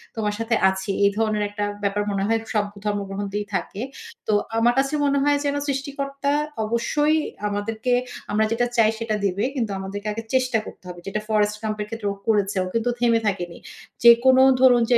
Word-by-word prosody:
তোমার 210 -2 -1
সাথে 230 +1 +1
আছি।" 190 +1 -4 0.2
এই 200 - +6
ধরনের 215 -2 +1
একটা 205 0 -3 0.2
ব্যাপার 205 +1 0
মনে 195 -1 -1
হয় 225 0 +2
সব 210 -1 +2 0.2
ধর্মগ্রন্থেই 205 0 -2
থাকে। 200 +2 -3 0.5
তো 215 - +2 0.3
আমার 240 +1 +4
কাছে 275 +2 0
মনে 280 0 +2
হয় 290 0 +3
যেন 285 - 0
সৃষ্টিকর্তা 275 0 -2 0.3
অবশ্যই 295 +7 +1 0.3
আমাদেরকে 220 +4 -1 0.4
আমরা 215 +1 +3
যেটা 235 +2 +2
চাই 220 -1 +5
সেটা 225 -1 -1
দিবে। 195 +1 0
কিন্তু 230 -6 -1
আমাদেরকে 200 +2 -6
আগে 225 +1 -5
চেষ্টা 255 -2 +2
করতে - - -11
হবে। 175 -1 -8
যেটা 195 +2 -2
Forest 210 -1 +2
Gulp 215 -1 -2
এর - - -2
ক্ষেত্রে 225 -2 -4
ও - - -11
করেছে, 205 -2 +2
ও - - -3
কিন্তু 230 +1 +1
থেমে 235 -1 +3
থাকেনি। 175 -3 -5 0.5
যেকোনো 245 +3 +7 0.2
ধরুন 245 -2 +6
যে 240 - +7
220 Hz, 185 wpm, -23 LUFS, 205-245 Hz, 0.5 s, যেকোনো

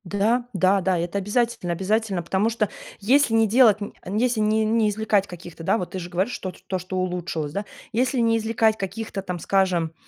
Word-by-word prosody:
Да, 215 +6 +1
да, 190 +1 +3
да, 185 -1 +1
это 175 +4 -2
обязательно 210 -3 -1
обязательно, 195 0 -1
потому 190 +6 +1
что 220 -3 -1 0.3
если 250 +4 +3
не 225 0 +4
делать 225 -1 +5
н 205 - -5 0.2
если 240 0 +1
не 215 +1 +2
не 220 0 +2
извлекать 210 -1 +1
каких-то, 175 -1 -10
да, 195 - +2
вот 180 - -5
ты 190 - -4
же 175 0 -7
говоришь, 185 +7 -1
что 185 - -5
т - - -18
то, 185 - -2
что 185 +1 -5
улучшилось, 175 -4 -2
да. 200 +1 -3 0.3
Если 250 +3 +1
не 230 -1 +3
извлекать 220 0 +1
каких-то 200 +1 -4
там, 180 -2 -4
скажем, 175 -2 +1
200 Hz, 200 wpm, -24 LUFS, 185-225 Hz, 0.3 s, делать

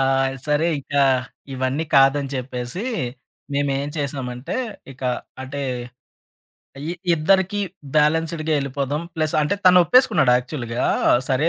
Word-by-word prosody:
ఆహ్, 135 0 +2
సరే 150 +2 +2
ఇంకా, 140 +1 0 0.5
ఇవన్నీ 130 +4 -1
కాదని 135 +1 +4
చెప్పేసి, 125 - -5 0.7
మేమేం 140 0 0
చేసామంటే, 130 -3 -3 0.4
ఇక 135 - -17 0.4
అటే, 140 +2 -5 1.3
ఇ - - -1 0.2
ఇద్దరికి 190 +5 +2 0.4
బ్యాలెన్స్‌డ్‌గ 160 +1 +2
ఎళ్ళిపోదాం. 140 +2 -2
ప్లసంటే, 155 0 +1
తను 180 0 +8
ఒప్పేసుకున్నాడు, 240 - +4
యాక్చువల్‌గా 125 -2 -3 0.4
సరే, 135 +5 +2
140 Hz, 100 wpm, -22 LUFS, 135-155 Hz, 1.3 s, తను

